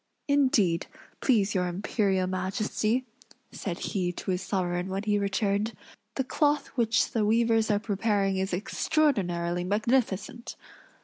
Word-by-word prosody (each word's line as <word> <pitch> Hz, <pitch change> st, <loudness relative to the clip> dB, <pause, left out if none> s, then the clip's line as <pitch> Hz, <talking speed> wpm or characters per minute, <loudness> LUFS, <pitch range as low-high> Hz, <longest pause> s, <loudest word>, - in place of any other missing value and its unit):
"Indeed, 250 Hz, -, +2 dB, 0.3 s
please 210 Hz, -6 st, +2 dB
your 180 Hz, -2 st, +1 dB
Imperial 190 Hz, +1 st, 0 dB
Majesty," 210 Hz, +6 st, -1 dB, 0.5 s
said 175 Hz, -4 st, -4 dB
he 180 Hz, -3 st, -2 dB
to 190 Hz, -, -4 dB
his 180 Hz, 0 st, -1 dB
sovereign 180 Hz, -2 st, -1 dB
when 195 Hz, +2 st, -3 dB
he 205 Hz, -1 st, +1 dB
returned, 200 Hz, +2 st, 0 dB, 0.4 s
"the 265 Hz, -, 0 dB
cloth 290 Hz, +2 st, +1 dB
which 230 Hz, -3 st, +1 dB
the 225 Hz, -, +1 dB
weavers 225 Hz, +1 st, +3 dB
are 205 Hz, -, +3 dB
preparing 200 Hz, -2 st, 0 dB
is 190 Hz, +1 st, -1 dB
extraordinarily 180 Hz, -, 0 dB
magnificent." 220 Hz, +2 st, -1 dB
205 Hz, 125 wpm, -28 LUFS, 185-230 Hz, 0.5 s, weavers